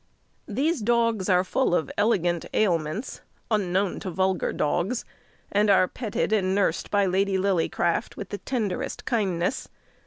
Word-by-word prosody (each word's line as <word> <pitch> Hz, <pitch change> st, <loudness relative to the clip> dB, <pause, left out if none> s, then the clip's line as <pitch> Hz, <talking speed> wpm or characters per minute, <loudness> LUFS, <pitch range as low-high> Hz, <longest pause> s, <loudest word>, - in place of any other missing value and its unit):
These 280 Hz, +7 st, 0 dB
dogs 230 Hz, -3 st, +1 dB
are 180 Hz, -1 st, +4 dB
full 190 Hz, 0 st, +1 dB
of 160 Hz, -5 st, -1 dB
elegant 175 Hz, -6 st, +1 dB
ailments 180 Hz, -, 0 dB, 0.3 s
unknown 195 Hz, -2 st, +1 dB
to 190 Hz, -, -5 dB
vulgar 190 Hz, +1 st, 0 dB
dogs; 175 Hz, +10 st, -1 dB, 0.5 s
and 205 Hz, +1 st, +3 dB
are 190 Hz, -2 st, +5 dB
petted 220 Hz, -1 st, -2 dB
and 190 Hz, -3 st, +2 dB
nursed 195 Hz, -5 st, 0 dB
by 200 Hz, -1 st, +2 dB
Lady 190 Hz, +1 st, +1 dB
Lillycraft 175 Hz, -3 st, 0 dB
with 195 Hz, -, -6 dB
the 205 Hz, -, -5 dB
tenderest 220 Hz, -8 st, -3 dB
kindness. 200 Hz, -2 st, -1 dB
195 Hz, 135 wpm, -25 LUFS, 180-215 Hz, 0.5 s, are